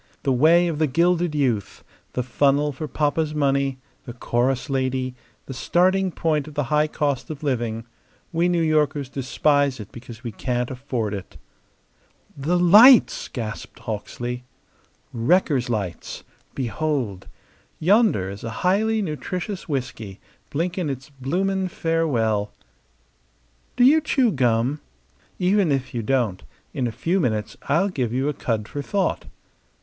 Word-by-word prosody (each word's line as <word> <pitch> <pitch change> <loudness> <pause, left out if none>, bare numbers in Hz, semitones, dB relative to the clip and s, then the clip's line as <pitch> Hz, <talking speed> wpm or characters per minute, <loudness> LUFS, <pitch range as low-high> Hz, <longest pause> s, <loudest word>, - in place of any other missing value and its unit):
The 135 - +2
way 165 +7 +5
of 160 -3 -2
the 155 - +3
gilded 170 +3 +1
youth; 125 -9 -1 0.3
the 125 - -1
funnel 140 +3 +2
for 150 +3 -6
papa's 150 +1 0
money; 140 -2 +1 0.3
the 120 - -7
chorus 125 +2 0
lady; 130 -2 -1 0.3
the 135 - -7
starting 185 +8 +2
point 155 -3 0
of 150 - -11
the 145 - +1
high 150 +1 +4
cost 145 -1 -2
of 155 -1 -7
living. 120 -5 -1 0.5
We 170 +2 +2
New 175 -2 +2
Yorkers 150 -3 +1
despise 140 0 +1
it 105 -1 -9
because 120 0 -11
we 120 - -4
can't 125 +2 -2
afford 125 -5 -3
it." 100 -2 -7 1.0
"The 155 +6 0
lights!" 210 +8 +7
gasped 110 -3 -6
Hawksley. 120 +3 -5 0.7
"Wreckers' 130 0 +2
lights. 100 -7 -4 0.3
Behold! 130 -6 -2 0.5
Yonder 195 - +3
is 100 - -9
a 115 - -3 0.2
highly 215 +4 +2
nutritious 180 +3 -4
whisky 115 -8 -4 0.3
blinking 170 +2 -2
its 135 +1 -6
bloomin' 185 +8 -1
farewell. 120 - 0 1.2
Do - - +3
you 300 +5 +6
chew 265 -6 +2
gum? 125 - +1 0.6
Even 185 -2 +2
if 135 0 -1
you 120 - -2
don't, 115 - 0 0.3
in 125 - -1
a - - -3
few 165 - 0
minutes 110 - -1
I'll 170 +8 +3
give 130 - -2
you 130 +3 0
a - - -1
cud 110 -5 -2
for 145 - -5
thought. 190 +5 -1
140 Hz, 140 wpm, -23 LUFS, 120-170 Hz, 1.2 s, lights